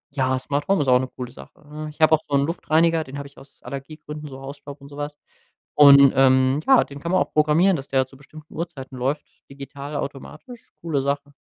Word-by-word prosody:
Ja, 130 -1 +1
Smart 145 +2 -2
Home 195 -5 +2
ist 135 - -2
auch 125 0 +5
'ne 130 - -3
coole 125 -1 -8
Sache, 65 - -15
ne? 155 +1 -7
Ich 150 - -15
habe 155 0 +5
auch 155 - +3
so 140 - -1
'n 140 0 +3
Luftreiniger, 165 0 +1
den 135 +1 -9
habe 140 - -6
ich 140 - -21
aus 135 - -18
Allergiegründen, 150 +3 -8
so 135 0 -10
Hausstaub 140 +1 -10
und 140 - -13
so 145 - -12
was, 145 0 -5 0.6
und, 140 -2 +8
ähm, 130 +1 +4
ja, 265 -2 +6
den 140 0 -11
kann 170 +4 -4
man 185 - +3
auch - - -2
programmieren, 155 +5 +3
dass 135 0 -8
der 135 -1 +1
zu 135 - -18
bestimmten 155 +2 -15
Uhrzeiten 150 -6 -7
läuft 135 +4 -2 0.2
digital 140 +1 -9
automatisch, 185 - -8
coole 155 -5 -1
Sache. 145 +1 -3
145 Hz, 225 wpm, -22 LUFS, 135-155 Hz, 0.6 s, und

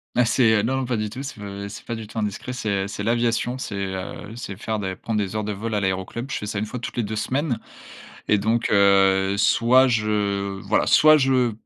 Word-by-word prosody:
Mais, 125 - +4
c'est, 115 -1 +3
heu 105 - +2
non, 130 +4 0
non, 130 - -1
pas 120 -2 -1
du 105 - -1
tout, 130 - -6
c'est 135 -5 -7
pas 100 0 -6
c'est 100 - -10
pas - - -4
du 110 -1 -7
tout 110 - -11
indiscret. 105 +3 -3
C'est, 120 -4 -4 0.2
heu, - - -5
c'est 105 - -5
l'aviation. 120 +2 0
C'est, 110 - -5
heu, 95 +2 -5
c'est 110 -5 -6
faire 110 +1 -3
des 95 -2 -3
prendre 110 +3 -3
des 100 +1 -3
heures 110 - -1
de 105 - -3
vol 110 +2 -3
à - - +2
l'aéroclub. 95 +7 -3
Je - - -1
fais - - -5
ça 105 - -4
une 105 - -1
fois 125 +4 -6
toutes 120 - -7
les 120 - +1
2 110 +1 -4
semaines 130 +4 -1 0.7
et 105 - +4
donc, 115 +3 0
heu, 95 -1 +4
soit 125 +5 +4
je 100 -4 -1
voilà, - - +1
soit 155 0 +7
je 130 -3 +2
110 Hz, 245 wpm, -23 LUFS, 100-120 Hz, 0.7 s, soit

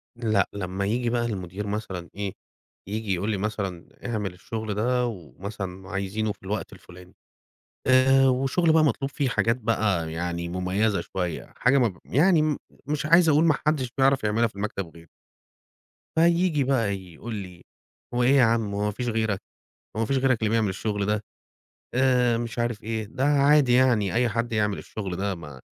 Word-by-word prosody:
لأ، 110 -4 +1
لمّا 95 0 -3
ييجي 120 +4 0
بقى 120 0 0
المدير 100 -2 -4
مثلًا 100 -4 -4
إيه، 100 -1 -4 0.5
ييجي 105 0 -2
يقول 95 +4 -1
لي 105 - 0
مثلًا: 95 -4 -3 0.2
"اعمل 105 -6 -2
الشُغل 110 +4 -5
ده،" 125 +4 +1
ومثلًا 95 -1 -7
عايزينه 100 +2 -2
في 100 - -12
الوقت 100 +2 -4
الفُلاني. 90 +1 -15 0.7
آآ 135 +1 +5
والشُغل 135 +6 +2
بقى 160 -1 +5
مطلوب 140 -2 +1
فيه 135 -1 0
حاجات 115 -3 +2
بقى 105 -8 0
يعني 85 +1 -3
مُميّزة 90 +2 0
شوية 90 -2 -4
حاجة 125 +3 +4
مب 115 -9 +1
يعني 165 +5 +4
م 155 -2 +1 0.3
مش 150 0 -1
عايز 165 +1 +6
أقول 150 +1 +4
ما 160 - +5
حدّش 135 -5 +1
بيعرف 135 -1 +3
يعملها 110 +2 +2
في 110 - -15
المكتب 100 -4 -4
غيري. 85 0 -15 1.1
فييجي 170 -2 +3
بقى 120 -7 +1
يقول 95 +5 -8
لي: 90 -4 -8 0.5
"هو 120 0 +2
إيه 120 - +4
يا 130 - +6
عم، 115 -3 +1
هو 105 +1 -1
ما 105 - 0
فيش 120 +4 -4
غيرك، 110 -3 0 0.6
هو - - -1
ما 115 - +1
فيش 135 - 0
غيرك 130 -2 +2
اللي 110 -2 +1
بيعمل 110 -2 +2
الشُغل 100 +1 -2
ده." 105 0 0 0.7
آآ 125 -2 +3
مش 115 0 -4
عارف 120 -2 -2
إيه، 110 0 -2
"ده 120 +5 -4
عادي 145 -2 +4
يعني 120 -6 +3
أي 120 +1 +2
حد 115 +2 -2
يعمل 105 -2 +1
الشُغل 95 -5 -5
ده، 100 +1 -2
ما 75 -6 -10
110 Hz, 175 wpm, -25 LUFS, 100-125 Hz, 1.1 s, عايز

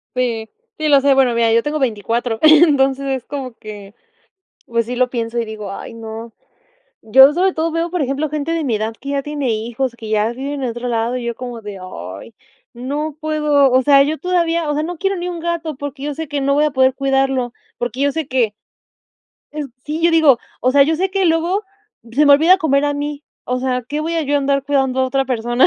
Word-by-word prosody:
Sí, 230 -3 -1 0.3
sí, 310 -1 -1
lo 285 -1 +6
sé. 275 0 +3
Bueno, 265 -3 +3
mira, 230 -1 +2
yo 230 0 +3
tengo 300 +1 -2
24, 230 -1 -1
entonces 285 -4 +5
es 265 -2 -2
como 270 -4 -6
que, 205 -1 -10 0.7
pues, 230 0 0
sí 245 - -4
lo 255 0 +2
pienso, 235 -1 -3
y 235 - 0
digo: 215 -2 -7
"Ay 215 - -8
no". 225 0 -8 0.7
Yo 265 +6 +7
sobre 370 +3 +2
todo 325 0 -1
veo 330 +1 -1
por 360 0 -2
ejemplo 280 +2 -1
gente 305 +2 -2
de 330 -1 -1
mi 240 -6 0
edad 220 +1 -3
que 275 - -7
ya 280 -1 -1
tiene 290 -3 -2
hijos, 235 +3 -2
que 225 -2 -9
ya 215 +1 +1
viven 275 +2 -5
en 250 - -1
otro 240 +2 -5
lado, 235 +1 -1
y 245 - -6
yo 235 0 -2
como 245 -1 -7
de: 205 -2 -8
"Ay 95 - -9 0.4
no 285 +5 -4
puedo". 300 -3 +2
O 255 +1 +4
sea 275 +1 +6
yo 300 +3 -1
todavía 335 -3 0
o - - 0
sea, 300 - -1
no 345 +3 -4
quiero 390 +3 -1
ni 355 0 -4
un 345 -2 -5
gato, 335 -2 -3
porque 285 0 -6
yo 295 0 -3
sé 320 +2 -5
que 290 0 -2
no 280 +1 +1
voy 295 +1 +3
a 300 - +1
poder 260 -1 +3
cuidarlo. 270 -2 0 0.2
Porque 245 +2 -4
yo 285 0 +2
sé 320 -2 -3
que 240 -5 +1 1.0
es 300 -1 -4 0.2
sí, 305 +2 -4
yo 340 - +5
digo: 315 -6 +5 0.2
"O 255 - +2
sea, 280 +1 +6
yo 315 +3 +1
sé 380 +3 0
que 390 -1 +1
luego 340 +5 +1 0.5
se 290 +6 +3
me 285 - +8
olvida 330 +6 +6
comer 285 -4 +2
a 290 - +1
mí", 290 0 -4 0.2
o 250 0 -2
sea, 250 -1 -1
¿qué 295 +1 -2
voy 325 +2 -2
a 330 - 0
yo 290 0 0
andar 275 -1 0
cuidando 270 -2 0
a - - +3
otra 270 +1 0
persona? 240 0 +2
275 Hz, 230 wpm, -18 LUFS, 240-305 Hz, 1.0 s, me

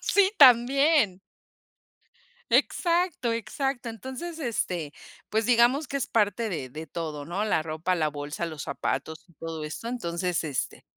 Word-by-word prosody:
Sí, 400 -1 +3
también. 260 - +6 1.3
Exacto, 340 -8 +2
exacto, 245 +2 -2
entonces, 260 +9 -7
este, 180 - -2 0.4
pues 220 0 +1
digamos 250 +4 +4
que 280 - -2
es 270 - -1
parte 220 +1 +1
de 145 -9 -4
de 155 +4 -7
todo, 155 -2 -5
¿no? 180 +7 -2
la 210 -6 +2
ropa, 160 +3 -1
la 155 -2 +1
bolsa, 145 +3 -4
los 155 -3 -6
zapatos 140 +5 -3
y - - -21
todo 165 -1 -6
esto, 155 +9 -6
entonces, 180 -7 -2
este 145 -5 -3
210 Hz, 140 wpm, -27 LUFS, 160-255 Hz, 1.3 s, también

